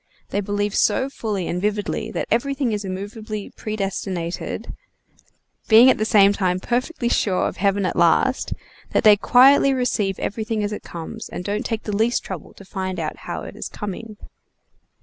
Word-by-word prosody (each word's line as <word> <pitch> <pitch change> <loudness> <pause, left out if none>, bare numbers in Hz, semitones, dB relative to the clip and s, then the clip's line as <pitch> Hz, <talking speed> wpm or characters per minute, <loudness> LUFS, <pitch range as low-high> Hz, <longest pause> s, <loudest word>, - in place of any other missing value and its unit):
They 205 - -1
believe 205 0 -1
so 260 +7 +2
fully 205 -8 -3
and 180 - -2
vividly 210 +1 -1
that - - -3
everything 270 +1 +1
is 210 -1 -2
immovably 205 +2 -6
predestinated, 195 -4 -4 0.9
being 235 +4 +8
at - - -1
the 215 - +1
same 205 -3 +5
time 185 -2 0
perfectly 245 - -1
sure 195 -5 +1
of - - -6
heaven 200 0 +1
at 180 - -1
last, 170 +10 +2 0.4
that - - +2
they 210 -1 +8
quietly 270 +5 +5
receive 210 -6 0
everything 220 0 -2
as 205 +1 -2
it - - -5
comes, 165 -2 -8
and - - -6
don't 210 +1 -2
take 225 -2 -3
the 210 - -3
least 225 +4 +1
trouble 185 -5 -7
to 195 - -13
find 190 -1 -4
out - - -3
how - - -6
it - - -9
is - - -6
coming. 210 +1 -7
210 Hz, 170 wpm, -22 LUFS, 195-230 Hz, 0.9 s, being